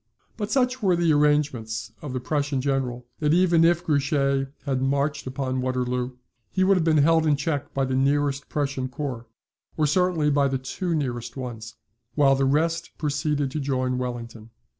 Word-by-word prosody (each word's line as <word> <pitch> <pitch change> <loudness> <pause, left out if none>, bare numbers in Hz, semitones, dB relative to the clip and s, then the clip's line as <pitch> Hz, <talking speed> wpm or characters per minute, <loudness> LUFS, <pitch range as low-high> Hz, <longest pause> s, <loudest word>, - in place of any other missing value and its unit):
But 205 -2 -4
such 255 -1 +1
were 190 -4 +3
the 170 -2 +3
arrangements 130 -7 +1
of 145 - -6
the 130 - -2
Prussian 145 +1 -1
General, 130 -3 -1
that 150 +1 +2
even 175 -2 +4
if 170 +1 +3
Grouchy 140 -2 +1 0.2
had 135 -3 0
marched 140 +1 0
upon 130 0 -2
Waterloo, 125 0 -2 0.3
he 185 - +1
would 195 +1 +5
have 180 - +1
been 160 -1 +3
held 160 +2 +4
in 150 - +4
check 145 0 -2
by 135 -1 +1
the 130 - -2
nearest 140 +1 +1
Prussian 140 -3 -2
corps, 130 -4 -5 0.5
or 155 - +2
certainly 170 -2 +2
by 140 -1 +3
the 135 0 0
two 165 +7 -3
nearest 120 -4 -3
ones, 115 -3 -7 0.4
while 140 -2 +5
the 135 0 +1
rest 160 +5 +1
proceeded 145 -2 -1
to 155 - -3
join 130 -2 -1
Wellington. 115 -3 -6
140 Hz, 175 wpm, -25 LUFS, 130-155 Hz, 0.5 s, would